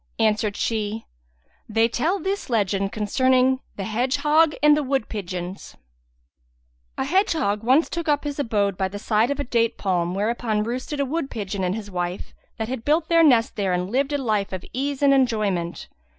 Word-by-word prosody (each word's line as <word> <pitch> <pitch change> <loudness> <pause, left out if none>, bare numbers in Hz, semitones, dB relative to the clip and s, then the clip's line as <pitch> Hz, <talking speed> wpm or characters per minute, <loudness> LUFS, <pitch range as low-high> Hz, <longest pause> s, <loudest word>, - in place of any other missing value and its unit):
Answered 215 -2 +1
she:—They 210 - -3
tell 310 - 0
this 390 -3 -3
legend 200 -3 0
concerning 255 +4 +2 0.2
THE 195 - -4
HEDGEHOG 295 +8 +2
AND 300 0 +7
THE 300 - +1
WOOD 270 -4 -1
PIGEONS 185 -2 -6 1.2
A - - -1
hedgehog 315 - +1
once 260 +8 +3
too 340 - -3
up 290 -1 +2
his 290 -1 -4
abode 205 -7 0
by 190 - +1
the 200 +2 -7
side 220 +3 +1
of 285 0 -2
a - - 0
date 235 -2 0
palm, 180 -2 -1
whereon 215 +1 0
roosted 255 +6 -4
a 280 - +1
wood 280 +1 -2
pigeon 200 -3 -4
and 180 +1 0
his 205 -2 -7
wife 180 0 -4 0.2
that 220 -1 -3
had 250 -1 -4
built 310 +4 +1
their 335 -1 +5
next 240 -7 +4
there 195 -3 0
and 180 +2 -2
lived 275 +3 +1
a 290 - +1
life 215 -7 -1
of 185 -1 -5
ease 280 +2 -2
and 280 -1 +6
enjoyment. 210 -10 0
225 Hz, 180 wpm, -23 LUFS, 200-275 Hz, 1.2 s, AND